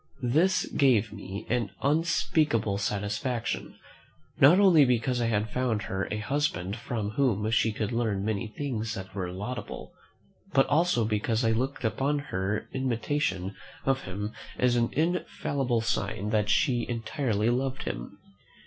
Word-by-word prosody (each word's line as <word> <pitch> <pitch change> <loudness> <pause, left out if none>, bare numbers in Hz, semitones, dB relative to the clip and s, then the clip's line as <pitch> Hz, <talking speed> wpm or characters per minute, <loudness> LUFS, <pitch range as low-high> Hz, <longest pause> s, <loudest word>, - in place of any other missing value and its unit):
This 185 +5 +3
gave 115 -7 +3
me 100 -1 -7
an 120 -4 0
unspeakable 150 -8 +2
satisfaction, 105 +5 -2 0.6
not 155 +8 +7
only 180 -7 +7
because 125 -1 +1
I 115 - +1
had 105 -1 0
found 120 -5 0
her 95 0 -2
a 105 - -2
husband 105 -6 -1
from 110 -2 -3
whom 110 -4 +1
she 110 0 +3
could 105 +1 -3
learn 110 -4 0
many 110 +1 -1
things 115 -2 -3
that 95 0 -7
were 90 -3 -3
laudable, 105 +7 -6 0.6
but 135 - +5
also 155 -6 +2
because 110 +2 0
I 115 - +3
looked 130 +5 -1
upon 135 +6 +1 0.2
her 95 +3 -1
imitation 120 -6 -1 0.3
of 135 0 +1
him 105 +3 -4 0.2
as 125 -1 +3
an 120 -1 +2
infallible 140 -6 0
sign 105 -2 -2
that 105 -1 +1
she 120 +1 +2
entirely 115 -1 0
loved 130 +1 -1
him. - - -5
115 Hz, 140 wpm, -28 LUFS, 105-135 Hz, 0.6 s, not